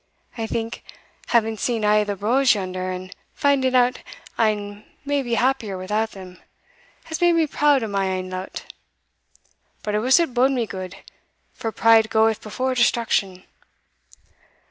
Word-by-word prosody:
I 225 Hz, -2 st, -3 dB
think, 225 Hz, 0 st, -4 dB, 0.5 s
having 225 Hz, -1 st, +1 dB
seen 230 Hz, 0 st, -1 dB
a' 210 Hz, 0 st, +4 dB
the 205 Hz, -1 st, -3 dB
braws 245 Hz, +6 st, +3 dB
yonder, 185 Hz, -2 st, -4 dB
and 185 Hz, +1 st, -7 dB, 0.2 s
finding 265 Hz, -2 st, +2 dB
out 250 Hz, 0 st, +3 dB, 0.4 s
ane 210 Hz, -2 st, -1 dB, 0.2 s
may 285 Hz, 0 st, 0 dB
be 240 Hz, -3 st, -2 dB
happier 235 Hz, -6 st, 0 dB
without 210 Hz, +4 st, -2 dB
them, 185 Hz, -2 st, -11 dB, 0.6 s
has 320 Hz, 0 st, -6 dB
made 345 Hz, 0 st, +5 dB
me 330 Hz, -1 st, +3 dB
proud 290 Hz, -3 st, +2 dB
o' -, -, -2 dB
my 195 Hz, -2 st, -1 dB
ain 185 Hz, -1 st, -3 dB
lot 185 Hz, +1 st, -6 dB, 1.2 s
But 210 Hz, -, -3 dB
I 210 Hz, -, +2 dB
wuss 255 Hz, +8 st, +4 dB
it 330 Hz, -7 st, 0 dB
bode 260 Hz, +3 st, +3 dB
me 245 Hz, -3 st, 0 dB
gude, 185 Hz, -2 st, -7 dB, 0.6 s
for 225 Hz, -, -4 dB
pride 225 Hz, +1 st, +4 dB
goeth 220 Hz, 0 st, +2 dB
before 255 Hz, +5 st, -2 dB
destruction. 225 Hz, -6 st, +1 dB
220 Hz, 150 wpm, -22 LUFS, 200-255 Hz, 1.2 s, made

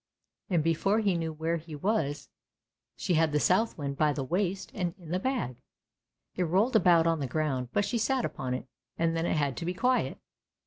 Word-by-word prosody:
" -, -, -53 dB
And 170 Hz, -5 st, +2 dB
before 165 Hz, +6 st, +2 dB
he 200 Hz, -3 st, +2 dB
knew 165 Hz, -1 st, -2 dB
where 160 Hz, +2 st, -1 dB
he 160 Hz, -1 st, -9 dB
was 145 Hz, -5 st, -1 dB, 0.7 s
she 180 Hz, -, -1 dB
had 160 Hz, -1 st, +3 dB
the 150 Hz, -, +2 dB
Southwind 155 Hz, -8 st, +1 dB
by 150 Hz, -1 st, +3 dB
the 140 Hz, -, -3 dB
waist 185 Hz, +6 st, -1 dB
and 180 Hz, -4 st, -2 dB
in 170 Hz, -5 st, -13 dB
the 180 Hz, -, +1 dB
bag; 215 Hz, -, -2 dB, 0.8 s
it -, -, -2 dB
rolled 195 Hz, +9 st, +2 dB
about 175 Hz, -5 st, +5 dB
on 165 Hz, -1 st, +2 dB
the 140 Hz, -, -2 dB
ground, 130 Hz, -3 st, -1 dB
but 205 Hz, -, +1 dB
she 235 Hz, -, -1 dB
sat 250 Hz, +3 st, +1 dB
upon 125 Hz, -1 st, -3 dB
it 125 Hz, -, -5 dB, 0.3 s
and 165 Hz, 0 st, +1 dB
then 165 Hz, +1 st, 0 dB
it -, -, +1 dB
had 140 Hz, -3 st, 0 dB
to -, -, -4 dB
be 180 Hz, +1 st, -2 dB
quiet. 250 Hz, +6 st, +1 dB
165 Hz, 210 wpm, -29 LUFS, 150-195 Hz, 0.8 s, about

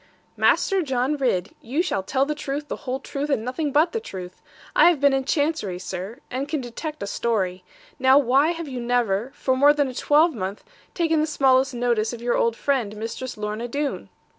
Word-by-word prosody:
'Master 390 Hz, -2 st, +3 dB
John 265 Hz, -1 st, 0 dB
Ridd, 240 Hz, -11 st, 0 dB
you 280 Hz, +9 st, -1 dB
shall 195 Hz, -, -1 dB
tell 265 Hz, +8 st, 0 dB
the 300 Hz, -, -1 dB
truth, 290 Hz, 0 st, -5 dB
the -, -, -2 dB
whole 260 Hz, +1 st, -1 dB
truth, 280 Hz, +1 st, -4 dB
and 230 Hz, -6 st, 0 dB
nothing 285 Hz, +4 st, -2 dB
but 310 Hz, +5 st, +3 dB
the 455 Hz, -, -1 dB
truth. 185 Hz, -, -9 dB, 0.3 s
I 340 Hz, -, +7 dB
have 340 Hz, -5 st, +1 dB
been 280 Hz, 0 st, +4 dB
in 270 Hz, -1 st, 0 dB
Chancery, 290 Hz, -, 0 dB
sir; 185 Hz, +4 st, -6 dB
and 265 Hz, +3 st, -3 dB
can 305 Hz, 0 st, -1 dB
detect 280 Hz, +4 st, -6 dB
a -, -, -2 dB
story. 195 Hz, -4 st, -1 dB, 0.4 s
Now 260 Hz, +1 st, +6 dB
why 275 Hz, +2 st, +4 dB
have 335 Hz, -1 st, -3 dB
you 255 Hz, -3 st, -5 dB
never, 235 Hz, -1 st, 0 dB
for 260 Hz, -, 0 dB
more 285 Hz, +3 st, +6 dB
than 290 Hz, -2 st, +1 dB
a -, -, -7 dB
twelvemonth, 260 Hz, -, +1 dB, 0.3 s
taken 325 Hz, -3 st, +2 dB
the 310 Hz, -, 0 dB
smallest 265 Hz, -3 st, +3 dB
notice 235 Hz, -2 st, 0 dB
of 235 Hz, -, -7 dB
your 240 Hz, 0 st, +1 dB
old 230 Hz, -1 st, +1 dB
friend, 235 Hz, -6 st, -1 dB
Mistress 225 Hz, +3 st, -5 dB
Lorna 210 Hz, +3 st, -3 dB
Doone?' 285 Hz, +3 st, -3 dB
260 Hz, 200 wpm, -24 LUFS, 230-295 Hz, 0.4 s, I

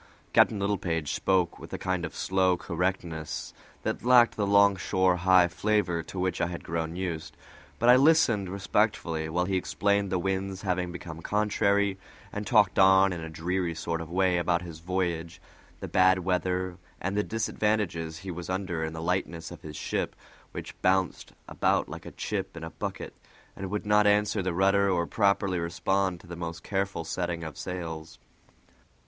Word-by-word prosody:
Captain 110 Hz, -, +5 dB
Littlepage 95 Hz, -6 st, -1 dB
spoke 90 Hz, -3 st, +1 dB
with -, -, -11 dB
a -, -, -2 dB
kind 95 Hz, -2 st, -2 dB
of 80 Hz, -, -8 dB
slow 95 Hz, -1 st, +2 dB
correctness 85 Hz, -3 st, -3 dB, 0.3 s
that -, -, -2 dB
lacked 120 Hz, -1 st, +6 dB
the 105 Hz, -2 st, 0 dB
longshore 95 Hz, -2 st, +3 dB
high 90 Hz, 0 st, +5 dB
flavor 90 Hz, -1 st, 0 dB
to 85 Hz, -, -10 dB
which 90 Hz, -1 st, -1 dB
I -, -, +2 dB
had 85 Hz, -1 st, -6 dB
grown 80 Hz, 0 st, -3 dB
used; 85 Hz, -3 st, -4 dB, 0.4 s
but 120 Hz, -, +1 dB
I 125 Hz, -, +9 dB
listened 135 Hz, -, +4 dB
respectfully 95 Hz, -5 st, 0 dB
while 90 Hz, +2 st, 0 dB
he 95 Hz, 0 st, 0 dB
explained 100 Hz, +1 st, 0 dB
the 95 Hz, -, +2 dB
winds 95 Hz, +1 st, -2 dB
having 90 Hz, -2 st, -1 dB
become 85 Hz, -2 st, -8 dB
contrary, 100 Hz, -1 st, +1 dB, 0.3 s
and 105 Hz, 0 st, -4 dB
talked 105 Hz, -4 st, +4 dB
on 95 Hz, 0 st, +6 dB
in 85 Hz, -, -5 dB
a 80 Hz, -, -6 dB
dreary 85 Hz, +2 st, -2 dB
sort 85 Hz, 0 st, -3 dB
of 80 Hz, -, -7 dB
way 90 Hz, 0 st, +2 dB
about 85 Hz, 0 st, +1 dB
his 85 Hz, -3 st, -9 dB
voyage, 85 Hz, -1 st, -2 dB, 0.4 s
the -, -, -4 dB
bad 95 Hz, 0 st, +4 dB
weather, 90 Hz, -1 st, -1 dB, 0.2 s
and 95 Hz, +2 st, -2 dB
the 105 Hz, -, +3 dB
disadvantages 105 Hz, -7 st, -1 dB
he 95 Hz, +4 st, -6 dB
was 85 Hz, +1 st, -7 dB
under 90 Hz, -3 st, -2 dB
in 80 Hz, 0 st, -3 dB
the 80 Hz, 0 st, -6 dB
lightness 85 Hz, -2 st, -2 dB
of 85 Hz, -, -10 dB
his 75 Hz, -1 st, -9 dB
ship, -, -, -2 dB, 0.4 s
which -, -, -7 dB
bounced 95 Hz, -1 st, +1 dB
about -, -, +1 dB
like -, -, -8 dB
a -, -, -7 dB
chip 95 Hz, -3 st, -4 dB
in 85 Hz, -, -7 dB
a 80 Hz, -, -6 dB
bucket, -, -, -5 dB, 0.4 s
and 95 Hz, -1 st, -5 dB
would 105 Hz, +2 st, -3 dB
not 105 Hz, 0 st, +4 dB
answer 105 Hz, 0 st, +3 dB
the 90 Hz, -1 st, -1 dB
rudder 100 Hz, +2 st, +3 dB
or 85 Hz, -2 st, +1 dB
properly 100 Hz, -2 st, +1 dB
respond 90 Hz, +2 st, 0 dB
to 95 Hz, -, -16 dB
the 85 Hz, 0 st, -8 dB
most 85 Hz, -1 st, -6 dB
careful 100 Hz, -3 st, -2 dB
setting 85 Hz, 0 st, -3 dB
of 80 Hz, -3 st, -6 dB
sails. 80 Hz, -3 st, -6 dB
95 Hz, 175 wpm, -28 LUFS, 85-100 Hz, 0.4 s, I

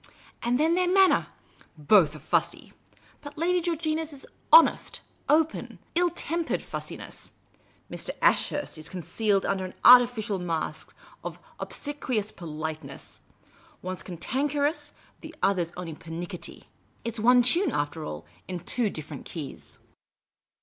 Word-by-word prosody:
And 240 Hz, +2 st, +1 dB
then 320 Hz, +2 st, +3 dB
their 360 Hz, 0 st, +2 dB
man 385 Hz, 0 st, +6 dB
ner! -, -, +1 dB, 0.5 s
Both 155 Hz, 0 st, +4 dB
are 150 Hz, -, -13 dB
fussy; -, -, -1 dB, 0.5 s
but 290 Hz, 0 st, -10 dB
Lady 355 Hz, +3 st, +2 dB
Georgina's 320 Hz, -2 st, -1 dB
is 280 Hz, -2 st, -7 dB, 0.3 s
honest, -, -, +6 dB, 0.3 s
open, 320 Hz, +1 st, +1 dB, 0.2 s
ill 350 Hz, +1 st, +3 dB
tempered 335 Hz, +1 st, -2 dB
fussiness; -, -, -8 dB, 0.5 s
Mr. -, -, -5 dB
Ashurst's 290 Hz, -, +1 dB
is 155 Hz, -, -7 dB
concealed 195 Hz, +3 st, 0 dB
under 195 Hz, -1 st, 0 dB
an 185 Hz, -, -7 dB
artificial 240 Hz, -5 st, +7 dB
mask 165 Hz, -3 st, -4 dB, 0.3 s
of -, -, -6 dB, 0.2 s
obsequious 255 Hz, -8 st, -3 dB
politeness. 155 Hz, -4 st, -7 dB, 0.6 s
One 185 Hz, +1 st, -4 dB
's -, -, -4 dB
cantanker 275 Hz, -, -1 dB
ous; 315 Hz, -, -4 dB, 0.3 s
the -, -, -10 dB
other 190 Hz, -3 st, +3 dB
's 170 Hz, -, -8 dB
only 175 Hz, -3 st, -5 dB
pernicketty. 165 Hz, +3 st, -8 dB, 0.4 s
It 230 Hz, 0 st, -3 dB
's -, -, -4 dB
one 245 Hz, +3 st, +6 dB
tune, 335 Hz, +7 st, +4 dB
after 145 Hz, +2 st, -2 dB
all, 75 Hz, -, -6 dB, 0.2 s
in 180 Hz, -2 st, -5 dB
two 220 Hz, +4 st, 0 dB
different 155 Hz, -5 st, -7 dB
key.s." 155 Hz, -5 st, -8 dB
215 Hz, 135 wpm, -27 LUFS, -, 0.6 s, artificial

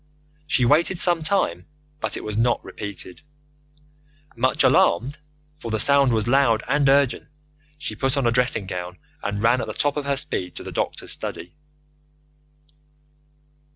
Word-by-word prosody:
She 125 Hz, -5 st, +2 dB
waited 160 Hz, +7 st, +3 dB
some 175 Hz, -1 st, +4 dB
time, 155 Hz, -, 0 dB, 0.3 s
but -, -, -2 dB
it -, -, -7 dB
was 105 Hz, -1 st, -5 dB
not 120 Hz, +2 st, +1 dB
repeated. 100 Hz, -3 st, -7 dB, 1.1 s
Much -, -, +1 dB
alarmed, 125 Hz, -, +3 dB, 0.4 s
for 115 Hz, -, -7 dB
the 110 Hz, -1 st, -1 dB
sound 140 Hz, +1 st, +4 dB
was 110 Hz, -1 st, 0 dB
loud 125 Hz, -3 st, +3 dB
and 145 Hz, -2 st, +2 dB
urgent, 140 Hz, -2 st, +2 dB, 0.5 s
she 110 Hz, -8 st, -5 dB
put 135 Hz, +4 st, -1 dB
on 135 Hz, -, 0 dB
a 120 Hz, -, +3 dB
dressing 120 Hz, -4 st, +1 dB
gown, 90 Hz, -1 st, -6 dB, 0.2 s
and 100 Hz, +1 st, -3 dB
ran 120 Hz, +3 st, +3 dB
at -, -, -5 dB
the 110 Hz, -, -5 dB
top 145 Hz, +5 st, -1 dB
of 145 Hz, -, -3 dB
her 140 Hz, -1 st, 0 dB
speed 90 Hz, -9 st, -3 dB
to -, -, -8 dB
the -, -, -7 dB
doctor's -, -, -3 dB
study. 85 Hz, -, -6 dB
120 Hz, 155 wpm, -23 LUFS, 105-140 Hz, 1.1 s, some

